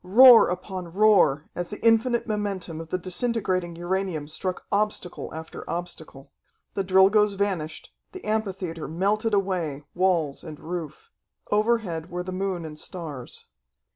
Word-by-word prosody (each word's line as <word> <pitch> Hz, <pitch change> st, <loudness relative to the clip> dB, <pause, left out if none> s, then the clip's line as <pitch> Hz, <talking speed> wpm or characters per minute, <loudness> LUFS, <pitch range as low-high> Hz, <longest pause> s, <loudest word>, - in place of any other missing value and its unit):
Roar 235 Hz, +5 st, +8 dB
upon 180 Hz, -1 st, -5 dB
roar, 185 Hz, -7 st, +4 dB
as 175 Hz, 0 st, -4 dB
the 210 Hz, -, -7 dB
infinite 230 Hz, +1 st, +3 dB
momentum 200 Hz, -6 st, -3 dB
of 165 Hz, -, -10 dB
the 185 Hz, -, 0 dB
disintegrating 185 Hz, -2 st, -1 dB
uranium 175 Hz, -3 st, -2 dB
struck 180 Hz, +4 st, -4 dB
obstacle 205 Hz, -3 st, -1 dB
after 160 Hz, 0 st, -8 dB
obstacle. 160 Hz, -5 st, -6 dB, 0.4 s
The 195 Hz, -, -1 dB
Drilgoes 195 Hz, +2 st, +4 dB
vanished, 190 Hz, -6 st, -3 dB, 0.2 s
the 375 Hz, -, -10 dB
amphitheatre 195 Hz, -6 st, -2 dB
melted 205 Hz, +6 st, +1 dB
away, 175 Hz, -8 st, -1 dB
walls 175 Hz, -6 st, +1 dB
and 155 Hz, -3 st, -9 dB
roof.... 175 Hz, -, -6 dB, 0.4 s
Overhead 210 Hz, -7 st, +1 dB
were 180 Hz, 0 st, -4 dB
the 185 Hz, -, -6 dB
moon 185 Hz, -2 st, -2 dB
and 150 Hz, -1 st, -8 dB
stars. 155 Hz, -10 st, -7 dB
185 Hz, 135 wpm, -25 LUFS, 165-210 Hz, 0.4 s, Roar